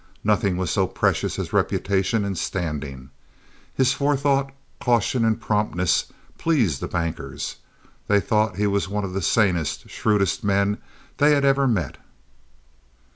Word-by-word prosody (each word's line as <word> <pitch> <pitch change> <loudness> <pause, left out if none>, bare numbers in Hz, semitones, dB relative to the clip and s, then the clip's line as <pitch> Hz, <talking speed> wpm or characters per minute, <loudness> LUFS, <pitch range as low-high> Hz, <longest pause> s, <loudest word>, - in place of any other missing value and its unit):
Nothing 100 -3 +2
was 90 -3 -1
so - - +2
precious - - 0
as - - -4
reputation 100 +2 +1
and 100 -1 -2
standing. 75 -8 -4 0.6
His 130 0 +3
forethought, 140 -1 +1 0.3
caution, 120 0 +1
and 110 -1 +2
promptness 105 -6 0 0.3
pleased 115 - +1
the - - -2
bankers. 85 -1 -4 0.5
They 100 0 +4
thought 110 -1 +1
he 105 +2 0
was 100 -1 0
one 105 +1 -2
of 95 -2 -4
the 95 - -2
sanest, 85 -8 +1
shrewdest 105 -4 +1
men 100 0 +1 0.4
they 150 +1 +5
had 140 -1 +2
ever 135 0 +3
met. 95 - -1
100 Hz, 135 wpm, -23 LUFS, 90-120 Hz, 0.6 s, they